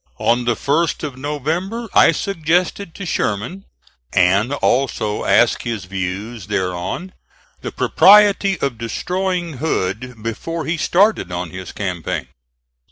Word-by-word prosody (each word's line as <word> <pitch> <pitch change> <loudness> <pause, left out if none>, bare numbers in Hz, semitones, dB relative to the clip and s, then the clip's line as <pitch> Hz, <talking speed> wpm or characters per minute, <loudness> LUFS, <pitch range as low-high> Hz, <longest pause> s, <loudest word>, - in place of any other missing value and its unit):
On 120 +1 +1
the 120 -1 +2
1st 155 +7 0
of 145 -4 -4
November 160 - -3
I - - +6
suggested 175 +1 -1
to 195 - -6
Sherman, 165 - -2 0.5
and 95 +7 +3
also 125 -6 0
asked - - +4
his 115 -5 -4
views 95 +3 -5
thereon, 95 - -3 0.5
the - - -5
propriety 200 -1 +5
of 130 -5 -2
destroying 180 - -2
Hood 115 -4 -2
before 160 +9 -4
he 165 +2 -1
started 190 - +2
on 90 -1 -4
his 95 -1 -7
campaign. 90 -5 -3
135 Hz, 120 wpm, -19 LUFS, -, 0.5 s, I